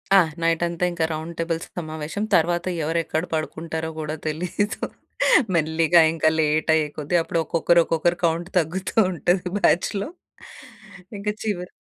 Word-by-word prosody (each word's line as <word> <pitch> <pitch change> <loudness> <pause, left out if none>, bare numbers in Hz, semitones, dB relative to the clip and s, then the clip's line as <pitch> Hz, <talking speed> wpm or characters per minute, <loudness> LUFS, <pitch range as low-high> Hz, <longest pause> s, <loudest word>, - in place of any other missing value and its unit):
ఆ! - - +9 0.2
నైటంతా 170 +1 0
ఇంకా 165 -2 0
round 160 +2 -5
table 165 -1 -1 0.2
సమావేశం. 155 +4 -4
తరువాత 175 +2 +2 0.2
ఎవరెక్కడ 165 0 -1
పడుకుంటారో 160 +1 -3
గూడా 155 0 -3
తెలీదు. 180 +6 -2 0.7
మెల్లిగా 165 +1 +4
ఇంకా 155 -1 +2
లేటయ్యేకొద్ది 155 +1 +1
అప్పుడు 165 0 -1
ఒక్కొక్కరు 170 +2 +3
ఒక్కొక్కరు 170 +2 0
కౌంట్ 170 +2 0
తగ్గుతూ 180 +4 -3 0.2
ఉంటది 175 +2 0
బ్యాచ్‌లో. 195 - +1 1.1
ఇంక 200 +1 -8 0.2
చివర 180 -5 -2
165 Hz, 115 wpm, -23 LUFS, 160-175 Hz, 1.1 s, ఆ